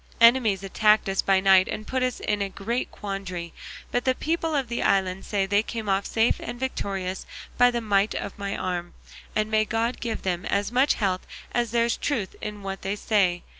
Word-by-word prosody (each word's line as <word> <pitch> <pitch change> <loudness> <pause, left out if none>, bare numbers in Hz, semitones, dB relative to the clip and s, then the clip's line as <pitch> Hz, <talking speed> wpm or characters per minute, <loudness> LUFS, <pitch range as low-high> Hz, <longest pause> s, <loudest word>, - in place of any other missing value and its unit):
Enemies 230 -5 +5
attacked 210 +2 +3
us 195 - +1
by 195 -1 +3
night 190 -1 +5
and 215 - -5
put 260 +2 -1
us 255 -1 0
in 210 -1 -1
a 200 - -1
great 225 +6 -3
quandary, 185 -4 -5 0.4
but 245 - 0
the 260 -1 +2
people 325 +1 -1
of 270 -3 0
the 235 0 -2
island 190 -1 +1
say 200 -2 0
they 205 +1 +3
came 225 -1 -5
off 195 0 +1
safe 225 +1 +2
and 240 0 -6
victorious 195 -7 -3 0.3
by 245 - +6
the 240 -1 -2
might 205 -1 +2
of - - -4
my 200 0 -3
arm; 175 -1 -3 0.4
and 215 0 0
may 215 0 +4
God 230 +2 -1
give 230 -2 -3
them 180 -1 -1
as 200 +2 0
much 260 +4 +3
health 190 -4 -1 0.2
as 240 -1 0
there's 235 +1 +1
truth 230 -10 -2
in 210 -1 -6
what 195 0 -5
they 195 +2 -2
say. 190 -5 +1
210 Hz, 205 wpm, -25 LUFS, 195-235 Hz, 0.4 s, by